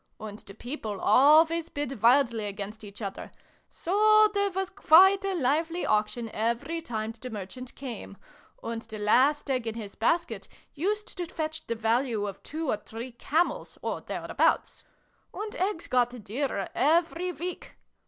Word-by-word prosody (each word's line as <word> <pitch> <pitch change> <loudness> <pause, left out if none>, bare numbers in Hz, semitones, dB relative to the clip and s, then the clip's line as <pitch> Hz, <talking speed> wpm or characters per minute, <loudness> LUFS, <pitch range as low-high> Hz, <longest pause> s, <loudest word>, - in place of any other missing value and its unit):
And 215 -1 -8
the 195 - -13
people 220 -5 -5
always 315 +8 +5
bid 275 -5 -4
wildly 235 -2 +4
against 205 +2 -6
each 205 +1 -9
other: 195 -1 -6 0.4
so 430 +4 +4
there 400 0 +2
was 380 0 -3
quite 385 +1 +6
a 390 -1 -1
lively 325 +4 0
auction 215 +2 0
every 235 +9 -1
time 220 -7 -4
the 235 +3 -9
Merchant 220 +4 -8
came, 235 -7 -7 0.5
and 230 0 -4
the 220 -1 -9
last 260 +9 +3
egg 255 -3 -1
in 225 - -3
his 210 -3 -7
basket 335 +10 0 0.3
used 415 +8 -2
to 350 - -2
fetch 315 -1 -5
the 230 - -1
value 225 -1 0
of 200 -2 -6
two 315 +1 -5
or 215 - +1
three 225 +4 -8
camels, 330 - -1
or - - -2
thereabouts. - - 0 0.5
And 425 +2 -5
eggs 375 -5 -1
got 245 -2 0
dearer 220 -2 -2
every 335 +4 +2
week. 355 +1 -6
260 Hz, 155 wpm, -28 LUFS, 220-335 Hz, 0.5 s, quite